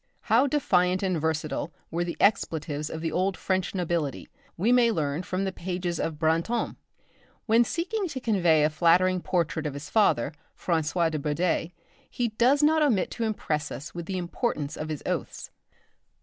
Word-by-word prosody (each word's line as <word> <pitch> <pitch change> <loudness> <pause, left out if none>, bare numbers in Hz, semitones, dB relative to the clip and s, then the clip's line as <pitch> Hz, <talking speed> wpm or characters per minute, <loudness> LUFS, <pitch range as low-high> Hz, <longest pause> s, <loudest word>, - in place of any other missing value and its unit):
How 240 +6 +3
defiant 185 -11 +2
and 185 -5 0
versatile 160 0 -2 0.2
were 170 +1 0
the 175 -1 -5
expletives 155 -7 +1
of 160 - -5
the 165 - -2
old 185 +1 0
French 190 0 -1
nobility, 170 -5 -2 0.3
we 210 +8 +2
may 245 -1 +5
learn 150 -4 -1
from 185 +1 -2
the 190 - -1
pages 175 -2 -3
of 160 - -2
Brantôme. 165 +9 0 0.7
When 230 +1 +5
seeking 370 - -2
to 270 -5 -5
convey 175 -10 +3
a 155 - +2
flattering 180 +3 +3
portrait 160 -4 -1
of 145 - -5
his 140 - -8
father, 150 - +3 0.3
François 165 0 +1
de 155 - -2
Bourdeilles, 165 +3 0 0.4
he 240 -1 -1
does 250 +7 +3
not 315 +1 +4
omit 235 -11 +2
to 230 - -2
impress 155 -8 -2
us 145 - -7
with 170 -1 -6
the 190 - -2
importance 170 - -2
of 155 - -5
his 155 -2 -4
oaths. - - -4
175 Hz, 170 wpm, -27 LUFS, 160-215 Hz, 0.7 s, may